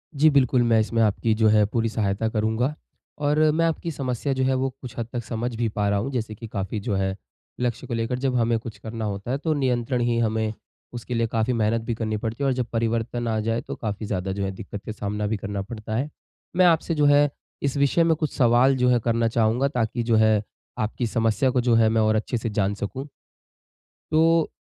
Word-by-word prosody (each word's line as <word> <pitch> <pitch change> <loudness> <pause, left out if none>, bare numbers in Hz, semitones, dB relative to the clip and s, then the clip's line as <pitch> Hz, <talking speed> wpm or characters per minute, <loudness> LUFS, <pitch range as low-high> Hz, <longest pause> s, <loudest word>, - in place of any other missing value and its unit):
जी। 155 +3 +5
बिल्कुल, 130 -3 +3
मैं 115 -2 +4
इसमें 115 +1 +1
आपकी 110 +1 +2
जो 110 - +6
है 105 -1 +5
पूरी 115 +2 -1
सहायता 105 0 -1
करूँगा 110 +5 0 0.5
और 150 +1 +2
मैं 165 +2 +2
आपकी 165 +1 -1
समस्या 135 -1 -2
जो 130 0 0
है 130 0 +2
वो 130 +1 0
कुछ 125 -3 -9
हद 115 -2 -3
तक 120 -2 -3
समझ 120 +1 -3
भी 115 0 0
पा 105 -1 -1
रहा 100 - +1
हूँ, 130 +7 -3
जैसे 115 -4 -3
कि 115 - -9
काफ़ी 100 0 -3
जो 100 -2 -2
है 95 0 0 0.5
लक्ष्य 120 -2 -2
को 120 - -4
लेकर 115 +2 -1
जब 130 -1 0
हमें 115 -1 +2
कुछ 110 -2 -9
करना 110 +1 -5
होता 100 +3 -4
है, 135 - +1
तो 155 +2 -1
नियंत्रण 125 -3 0
ही 120 -1 +1
हमें 110 -1 0 0.4
उसके 120 +1 -5
लिए 115 -1 +1
काफ़ी 115 +2 0
मेहनत 115 0 +1
भी 115 +1 -3
करनी 110 -1 -2
पड़ती 115 +5 -4
है - - +2
और 135 - +2
जब 125 -2 -1
परिवर्तन 115 +1 -1
आ 110 -1 0
जाए, 115 +2 -1
तो - - -7
काफ़ी 105 -1 -4
ज़्यादा 95 -2 -2
जो 100 +1 -3
है 95 - -2
दिक्कत 100 0 -8
का - - -4
सामना 105 0 -3
भी 110 0 -1
करना 100 0 -4
पड़ता 110 +1 -6
है। 140 +6 -1 0.5
मैं 185 - +6
आपसे 165 -1 +3
जो 150 - +3
है 145 0 +5 0.3
इस 140 0 -1
विषय 140 +4 +3
में 165 -1 +3
कुछ 155 -1 -3
सवाल 125 +1 +4
जो 125 0 +3
है 125 -1 +4
करना 115 0 +2
चाहूँगा 115 +3 +2
ताकि 120 -3 -1
जो 115 -1 +2
है 110 -1 +4 0.4
आपकी 110 +3 -1
समस्या 115 +3 +1
को 125 - +2
जो 120 -1 +3
है 115 -1 +5
मैं 110 0 +2
और 110 0 +3
अच्छे 115 +3 -1
से 115 - -3
जान 100 -1 0
सकूँ। 130 +7 -5 1.0
तो 165 +1 +4
115 Hz, 235 wpm, -24 LUFS, 110-130 Hz, 1.0 s, जो